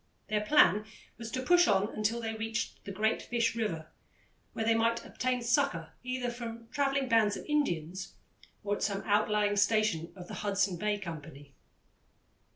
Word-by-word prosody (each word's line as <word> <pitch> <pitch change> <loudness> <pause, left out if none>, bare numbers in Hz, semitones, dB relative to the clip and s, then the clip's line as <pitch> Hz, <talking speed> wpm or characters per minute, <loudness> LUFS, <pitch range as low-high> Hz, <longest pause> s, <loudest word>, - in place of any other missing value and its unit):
Their 210 -1 +1
plan 210 - +5 0.3
was 230 -1 -6
to 255 +2 -3
push 350 +5 +5
on 205 0 +2
until 220 +2 -1
they 225 -1 -3
reached 220 0 -4
the 200 - -5
Great 215 +3 0
Fish 235 -1 0
River, 165 -9 -3 0.6
where 225 - -2
they 230 - +4
might 230 +1 +1
obtain 250 -1 -1
succour 235 - +1
either 255 -1 -2
from 230 -1 -7
travelling 275 -2 0
bands 220 -4 +3
of - - -9
Indians 190 - -1 0.5
or 205 0 0
at - - -10
some 200 -1 -1
outlying 210 0 +2
station 205 -6 +2
of 180 -2 -10
the - - -8
Hudson 200 -3 +1
Bay 210 +3 0
Company. 145 -6 -9
215 Hz, 165 wpm, -31 LUFS, 200-235 Hz, 0.6 s, plan